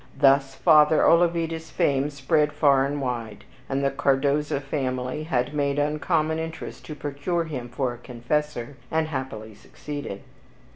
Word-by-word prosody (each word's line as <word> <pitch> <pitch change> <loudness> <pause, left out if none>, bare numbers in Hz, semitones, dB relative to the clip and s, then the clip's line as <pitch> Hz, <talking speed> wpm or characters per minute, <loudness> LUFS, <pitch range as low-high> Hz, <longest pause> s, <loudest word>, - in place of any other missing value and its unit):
Thus 135 -1 +4
Father 155 0 +5
Olavida's 165 -1 +2
fame 140 -1 +1
spread 150 +2 +1
far 140 -2 +4
and 145 +1 -3
wide, 115 -5 -4 0.3
and 135 +1 -1
the 135 - +2
Cardoza 140 +1 +1
family 135 0 -3
had 130 -3 -1
made 140 -1 0
uncommon 155 +2 0
interest 160 0 -6
to 150 - -6
procure 145 +4 -2
him 130 -7 -6
for 125 0 -2
a 120 - -12
Confessor, 125 +2 -3
and 160 0 0
happily 130 -6 -5
succeeded. 145 0 -8
145 Hz, 140 wpm, -25 LUFS, 130-155 Hz, 0.3 s, Father